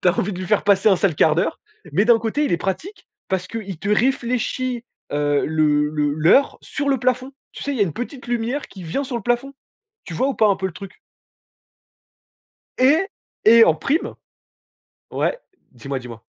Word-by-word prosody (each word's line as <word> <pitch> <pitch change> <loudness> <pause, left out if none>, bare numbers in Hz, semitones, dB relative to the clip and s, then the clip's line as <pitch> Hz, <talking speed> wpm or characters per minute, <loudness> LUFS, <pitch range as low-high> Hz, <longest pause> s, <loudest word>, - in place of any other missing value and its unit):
Tu - - +3
as 180 - +1
envie 210 -3 0
de 180 - -6
lui 185 - -5
faire 210 - +2
passer 200 0 +4
un 195 - +5
sale 185 -5 +1
quart 155 - +4
d'heure 170 - -1 0.3
mais 195 +8 +3
d'un 235 -1 +6
côté 230 +7 0
il - - -1
est - - +3
pratique 195 - -5 0.2
parce 185 -1 -1
qu'il 200 -5 -6
te 200 - -5
réfléchit, 250 +1 0 0.3
heu, 145 0 +1
le 150 -1 +2
le 150 -1 0
l'heure 160 - +4
sur 285 0 -3
le 270 -1 +2
plafond. 255 +2 -1 0.2
Tu - - -9
sais, 285 - -3
il - - -3
y - - -3
a - - +6
une 170 - -4
petite 250 - -7
lumière 240 +4 -2
qui 190 - -11
vient 175 - -2
sur 255 -2 -4
le 230 - -5
plafond. 240 +4 -1 0.5
Tu - - -8
vois 260 - +1
ou 275 - -1
pas 215 - +3
un 200 - +2
peu 190 - -2
le 190 - -6
truc? 195 +2 -11 1.8
Et 270 +5 +5 0.5
et 230 +1 +8
en 165 - +4
prime 275 - -1 1.0
ouais? - - -1 0.3
Dis-moi, 135 +2 -5
dis-moi? 120 -3 -10
210 Hz, 205 wpm, -21 LUFS, 165-255 Hz, 1.8 s, et